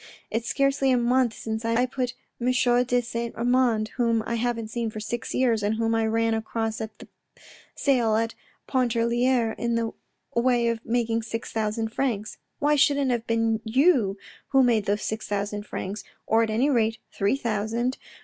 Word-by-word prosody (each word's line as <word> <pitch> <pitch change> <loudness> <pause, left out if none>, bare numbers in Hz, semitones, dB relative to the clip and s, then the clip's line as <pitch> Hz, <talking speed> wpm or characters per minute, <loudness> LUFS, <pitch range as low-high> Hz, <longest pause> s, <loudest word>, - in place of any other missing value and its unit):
It's 225 +2 -2
scarcely 275 -1 +2
a 255 - +4
month 240 -1 +2
since 220 0 -4
I 230 +2 +2
put 255 -1 -3 0.2
Michaud 250 0 +2
de 245 0 +1
Saint 235 0 -4
Amand, 240 -2 +2
whom 230 -2 +2
I - - -2
haven't 230 -1 -1
seen 230 0 -2
for 215 - -7
six 230 +2 -4
years, 235 -4 +2
and 205 +2 0
whom 225 0 0
I 225 -1 +2
ran 225 0 +1
across 225 0 -2
at 220 -1 -6
the - - -12 0.7
sale 240 -6 +2
at 225 +1 0 0.3
Pontarlier 240 -1 +2
in 235 0 0
the 230 -1 0 0.4
way 235 0 +3
of 230 0 -3
making 230 -1 0
six 225 0 -5
thousand 220 0 -1
francs. 220 -4 -2 0.2
Why 295 +1 +2
shouldn't 280 -2 +3
it - - +3
have 235 -1 -3
been 225 -1 +1
you 240 - +3 0.3
who 270 -1 +4
made 230 -4 +3
those 205 +1 0
six 220 0 -3
thousand 205 +1 -3
francs, 200 +3 -5 0.2
or 225 +1 +3
at 225 - +1
any 245 +7 +2
rate 225 -3 +2
three 200 +4 +1
thousand. 235 +1 -1
230 Hz, 180 wpm, -25 LUFS, 220-245 Hz, 0.7 s, a